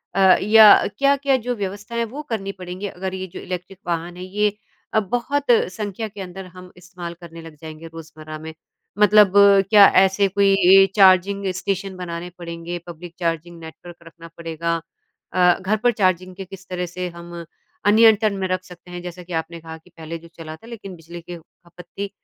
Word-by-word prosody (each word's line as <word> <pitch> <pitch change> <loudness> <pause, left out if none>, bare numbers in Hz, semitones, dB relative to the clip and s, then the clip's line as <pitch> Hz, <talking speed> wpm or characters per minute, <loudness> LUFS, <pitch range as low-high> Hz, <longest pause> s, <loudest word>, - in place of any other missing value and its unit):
अ, - - 0 0.2
या 215 0 +8 0.3
क्या-क्या 275 0 +2
जो 245 0 -3
व्यवस्थाएँ, 205 +3 -4
वो 260 +7 -8
करनी 195 -4 -3
पड़ेंगी, 185 +1 -7
अगर 190 0 -6
ये 190 0 -5
जो - - -7
इलेक्ट्रिक 185 +1 -7
वाहन 170 +1 -3
है, 180 - -7
ये 210 +2 -1 0.4
अ, 220 - +4
बहुत 245 +7 -2 0.3
संख्या 205 +2 -5
के 200 -1 -10
अंदर 190 +1 -8
हम 180 0 -13
इस्तेमाल 180 -1 -9
करने 165 -1 -11
लग 165 -1 -12
जाएँगे 160 0 -9
रोज़मर्रा 155 -1 -10
में? 160 +1 -9 0.5
मतलब 210 -1 +5 0.4
क्या 205 -2 +8 0.2
ऐसे 195 +1 +2
कोई 200 +1 +1 0.4
ए - - +5
चार्जिंग 195 0 +4
स्टेशन 195 0 -3
बनाने 175 -1 -6
पड़ेंगे, 170 0 -6
पब्लिक 175 0 -10
चार्जिंग 170 0 -3
नेटवर्क 160 +2 -12
रखना 165 0 -14
पड़ेगा 165 0 -3 0.6
अ, 180 -1 +3
घर 200 +4 0
पर 245 +3 +2
चार्जिंग 185 -4 0
के 195 +1 -8
किस 195 +1 -13
तरह 180 -1 -3
से 180 +1 -5
हम 170 0 -12 0.5
अ, - - +5
नियंत्रण 215 -2 +4
में 190 -1 -2
रख 185 0 -2
सकते 180 0 -15
हैं? 175 0 -7
जैसा 180 0 -9
कि 175 0 -10
आपने 165 +1 -4
कहा 160 0 -9
कि 160 +3 -23
पहले 165 -1 -8
जो 165 +1 -15
चला 155 -1 -8
था, 225 - -17
लेकिन 210 -5 -9
बिजली 170 +1 -11
के 175 +1 -9
खपत 170 +1 -17
थी। 200 +3 -6
180 Hz, 190 wpm, -21 LUFS, 170-200 Hz, 0.6 s, या